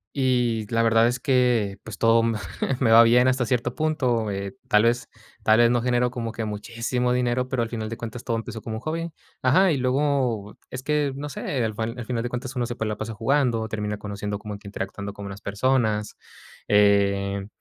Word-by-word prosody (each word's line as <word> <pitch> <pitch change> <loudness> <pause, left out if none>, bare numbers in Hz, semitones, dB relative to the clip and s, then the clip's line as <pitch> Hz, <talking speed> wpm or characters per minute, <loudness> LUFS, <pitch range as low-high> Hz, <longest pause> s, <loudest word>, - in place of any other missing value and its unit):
Y 125 -5 +1
la 115 0 +2
verdad 115 0 +4
es 120 0 -1
que, 120 -7 +2
pues, 110 -3 -8
todo 115 0 +4
me 115 -1 0 0.4
me 120 -4 +3
va 115 +1 +9
bien, 120 +2 +5
hasta 130 -2 +1
cierto 125 -3 0
punto, 130 -8 0
eh, 100 +3 -4
tal 105 0 +4
vez 120 +1 +1 0.3
tal 110 0 +5
vez 120 0 +5
no 120 -1 +2
generó 125 0 +1
como 115 -3 -4
que 115 0 -4
muchísimo 115 +4 -2
dinero, 125 0 0
pero, 130 -3 0
al 115 - -4
final 110 -2 -4
de 115 - -5
cuentas, 115 +1 -7
todo 115 -2 -1
empezó 115 0 -6
como 110 0 -5
hobby. 165 +5 -3 0.3
Ajá, 175 +9 +4
y 150 - +1
luego 130 -5 0
es 130 0 -6
que, 150 -2 +1
no 145 +1 -5
sé, 135 - -7 0.2
al 110 -1 -1
fan 115 +3 -4
a 120 - -5
final 120 -1 -2
de 120 - -3
cuentas 125 +2 -5
uno 120 -1 -1
se 120 - -5
puede 110 -2 -2
la 105 - -2
pasa 110 0 -5
jugando, 120 -1 +1
termina 105 -1 -3
conociendo, 105 0 -4
como 105 0 -7
interactuando 100 0 -6
con 100 0 -8
unas 100 +1 -8
personas. 105 0 0 0.5
Eh, 100 -1 +3
115 Hz, 210 wpm, -24 LUFS, 105-125 Hz, 0.5 s, va